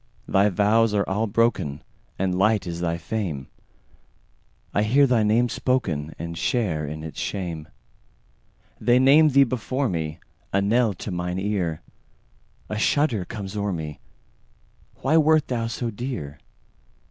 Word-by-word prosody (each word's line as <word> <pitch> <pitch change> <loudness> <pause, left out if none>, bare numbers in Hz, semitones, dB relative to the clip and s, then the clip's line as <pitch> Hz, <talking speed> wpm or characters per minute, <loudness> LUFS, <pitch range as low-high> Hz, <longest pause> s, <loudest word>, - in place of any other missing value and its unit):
Thy 100 +2 +3
vows 105 +3 +3
are 100 - +1
all 105 +4 0
broken, 100 -10 0 0.3
And 95 -1 0
light 105 0 +3
is 85 -1 -5
thy 85 -1 0
fame:I 85 +1 -7
hear 130 +7 +4
thy 125 -4 +3
name 110 +3 +3
spokenAnd 85 - -2
share 85 - 0
in 75 +1 -6
its 80 - -7
shame. 85 -6 -4 1.1
They 120 0 +4
name 145 +4 +6
thee 140 0 +6
before 130 +1 -1
me,A 80 +3 -4
knell 110 +1 +2
to 100 - -6
mine 90 0 -3
ear;A 95 - -6
shudder 120 -7 +1
comes 100 -1 -7
o'er 100 -1 -1
me—Why 75 - -6
wert 155 -1 +4
thou 115 -2 -1
so 115 +1 -3
dear? 100 - -5
100 Hz, 125 wpm, -24 LUFS, 85-120 Hz, 1.1 s, name